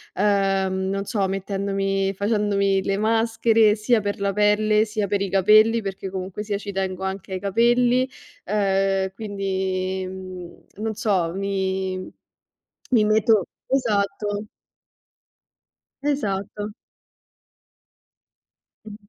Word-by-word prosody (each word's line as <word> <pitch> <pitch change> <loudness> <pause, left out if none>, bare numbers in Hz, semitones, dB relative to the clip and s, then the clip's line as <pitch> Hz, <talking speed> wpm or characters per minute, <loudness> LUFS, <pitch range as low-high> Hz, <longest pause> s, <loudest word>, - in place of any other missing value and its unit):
uhm, 195 -1 +1
non 195 0 -2
so, 200 -2 0
mettendomi 195 0 -1
facendomi 200 -1 +1
le 195 0 0
maschere 225 0 +3
sia 220 +1 +2
per 205 0 -3
la 200 0 0
pelle, 210 +1 +3
sia 215 -2 -2
per 200 0 0
i 200 - -1
capelli, 215 +4 +5
perché 195 -1 -5
comunque 190 +2 -5
sia 205 -1 -2
ci 200 0 -7
tengo 190 0 -2
anche 190 0 -5
ai 185 - -2
capelli, 240 +5 +2 0.3
uhm, 195 -2 +1
quindi 190 -3 -2
mhmm, 185 -1 -9 0.2
non 220 -1 -2
so, 185 -7 0
mi 190 -1 -2 0.8
mi 225 -4 +4
meto 215 -2 +3 0.2
esatto. 210 -4 -1 1.5
Esatto. 210 -7 -2 2.1
Mh. 210 -1 -9
200 Hz, 105 wpm, -23 LUFS, 190-215 Hz, 2.1 s, capelli